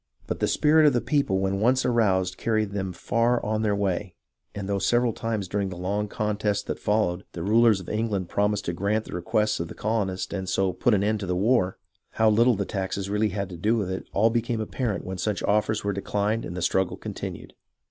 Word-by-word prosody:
But - - -4
the - - +1
spirit 155 +1 +4
of 145 - +4
the 120 - +2
people 140 -9 +1
when 95 0 0
once 125 +4 +2
aroused 95 -7 +2
carried 110 -3 0
them 95 -2 -3
far 115 +7 +1
on 110 +1 0
their 105 -2 +1
way; 95 -1 -2 0.4
and 100 -1 -4
though 100 -1 0
several 120 +2 +2
times 110 -4 -3
during 100 +1 -1
the 90 - -7
long 100 +4 -1
contest 105 -1 -1
that - - -4
followed, 100 -4 0
the 85 - -5
rulers 110 +1 +4
of 95 - -10
England 105 -4 -1
promised 105 +1 0
to 85 - -2
grant 100 +5 0
the - - -9
requests 105 +3 0
of 85 - -3
the - - -10
colonists 100 -4 -2
and 95 -2 -3
so 95 -1 +1
put 120 +3 +2
an 100 - +1
end 105 +1 +1
to 100 - -5
the 90 - 0
war, 100 -1 +2 0.4
how 110 -1 +4
little 115 +3 +4
the 100 0 -2
taxes 95 0 -3
had 100 - -4
really 105 +1 +2
had 100 0 -3
to 90 - -8
do 110 +7 +1
with 95 -4 -2
it 95 - -5
all 110 +3 +3
became 115 0 -1
apparent 110 -2 -2
when 95 0 -5
such 105 +2 -1
offers 105 +1 +1
were 100 0 0
declined 105 +3 -1
and 90 - -6
the 90 - -2
struggle 95 +1 +1
continued. - - -7
105 Hz, 230 wpm, -26 LUFS, 95-110 Hz, 0.4 s, spirit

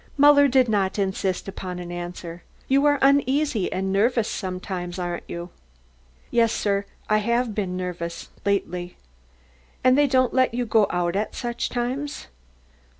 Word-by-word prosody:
Muller 285 0 +7
did 260 -1 +4
not 200 -3 0
insist 190 -1 -1
upon 185 -2 -6
an 175 -1 -7
answer. 175 -1 -6 0.3
"You 275 +2 +4
are 290 0 +4
uneasy 275 -5 +2
and 190 +1 -1
nervous 230 +2 +2
sometimes, 185 -2 -4
aren't 175 -1 -4
you?" 170 +1 -6 0.8
"Yes, 230 -2 +3
sir, 200 -2 0 0.2
I 215 0 +3
have 235 +1 0
been 190 -3 -2
nervous 175 -2 -5
lately." 180 -3 -2 0.9
"And 255 0 +5
they 290 +1 +4
don't 255 -2 +2
let 255 -2 +2
you 245 0 0
go 220 -2 +3
out 175 0 -1
at 210 +2 -2
such 240 -1 -3
times?" 255 +4 -3
205 Hz, 150 wpm, -24 LUFS, 180-255 Hz, 0.9 s, Muller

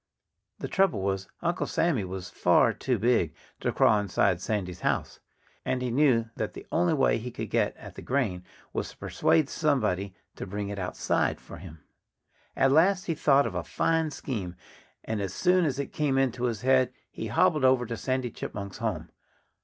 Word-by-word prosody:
The - - -5
trouble 190 - +2
was, 95 -1 -1 0.2
Uncle 170 +1 0
Sammy 165 - +1
was 95 0 -6
far - - +4
too 125 -3 -1
big 105 -8 +1 0.2
to - - -1
crawl 105 - +4
inside 95 -3 +1
Sandy's 90 -4 -3
house. - - -1 0.4
And 130 0 -1
he 125 - -1
knew 120 -4 +3
that 110 - -3
the - - -10
only 170 -1 +2
way 135 -4 +2
he 120 +3 -5
could - - -6
get - - +1
at - - -11
the - - -9
grain 115 -10 -1 0.3
was - - -2
to - - -15
persuade 155 -4 +2
somebody 100 - 0 0.2
to - - -6
bring 100 +1 -4
it 100 0 -5
outside 90 -1 0
for 85 - -11
him. 80 -3 -12 0.7
At 135 - +3
last 185 +6 +4
he 165 - 0
thought 140 -2 +4
of 115 - -3
a 90 -1 -2
fine 165 -1 0
scheme. 105 -12 -5 0.5
And 110 -2 -3
as 95 -2 -4
soon 180 -1 +3
as 140 -4 -1
it 140 -1 -4
came 145 -3 +1
into 130 -2 +1
his 115 -3 -2
head 130 0 +3 0.2
he - - -5
hobbled 150 -3 +2
over 130 -1 +4
to 115 0 -4
Sandy 130 0 -2
Chipmunk's 100 -2 -6
home. - - -3
125 Hz, 185 wpm, -28 LUFS, 100-140 Hz, 0.7 s, far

